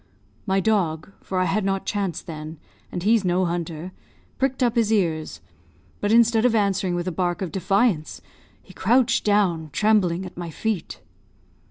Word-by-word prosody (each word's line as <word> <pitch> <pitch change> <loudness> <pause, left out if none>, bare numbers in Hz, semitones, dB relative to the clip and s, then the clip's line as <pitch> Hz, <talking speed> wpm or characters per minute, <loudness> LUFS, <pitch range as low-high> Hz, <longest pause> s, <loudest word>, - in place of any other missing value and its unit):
My 190 0 +2
dog, 185 -6 0
for 190 - -4
I 185 - +3
had 210 +3 0
not 195 0 -1
Chance 195 -4 -2
then, 155 -1 -8 0.3
and 175 - -4
he's 220 +1 +3
no 180 0 +1
hunter, 170 0 -4 0.5
pricked 265 -1 0
up 240 -1 +1
his 225 -2 +2
ears, 165 -7 0 0.6
but 205 - 0
instead 230 -1 +4
of 245 -2 +3
answering 195 -3 +1
with 175 +1 -3
a - - 0
bark 175 +2 -1
of 175 - -4
defiance, 195 -3 0 0.4
he 185 - -16
crouched 235 +5 +2
down, 185 -7 +1
trembling, 190 -1 +2
at 180 - -10
my 175 -1 -6
feet. 210 +3 -3
190 Hz, 165 wpm, -23 LUFS, 175-215 Hz, 0.6 s, instead